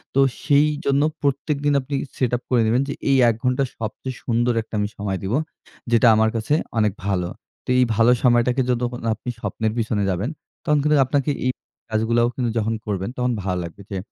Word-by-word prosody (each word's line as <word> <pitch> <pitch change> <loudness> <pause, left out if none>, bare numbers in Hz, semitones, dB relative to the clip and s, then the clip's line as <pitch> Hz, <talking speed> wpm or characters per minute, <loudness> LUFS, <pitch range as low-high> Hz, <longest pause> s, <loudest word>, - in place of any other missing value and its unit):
তো 135 - +4 0.2
সেইজন্য 145 -1 +2 0.2
প্রত্যেকদিন 140 +1 0
আপনি 140 +2 -4 0.2
set 125 -3 +1
up 125 - -16
করে 120 -3 +3
নিবেন 120 +4 +3
যে 140 - -2 0.2
এই 135 - +5
১ 115 - 0
ঘন্টার 125 +1 +1
সবচেয়ে 115 +4 -5
সুন্দর 120 +1 +1
একটা 110 - -18
আমি 105 - 0
সময় 100 -2 -2
দেবো। 110 +8 0 0.5
যেটা 115 0 +5
আমার 110 0 +3
কাছে 115 +6 0 0.2
অনেক 105 -2 +3
ভালো। 90 -3 0 0.4
তো - - -10
এই 125 - +5
ভালো 115 +2 +5
সময়টাকে 125 +1 +3
যতখন 120 0 -1
না - - +1
আপনি 120 +3 -7
স্বপ্নের 110 -1 -2
পেছনে 110 -3 0
যাবেন, 95 - -1 0.3
তখন 150 -3 +2
কিন্তু 150 -1 +3
আপনাকে 140 +2 0
এই 130 - +3 0.4
কাজগুলাও 115 +2 +2
কিন্তু 125 -3 -1
যখন 110 +1 0
করবেন, 100 -1 -2
তখন 125 0 +1
ভালো 90 -2 -1
লাগবে। 85 +4 -9
যে 95 - -2
120 Hz, 190 wpm, -22 LUFS, 110-135 Hz, 0.5 s, এই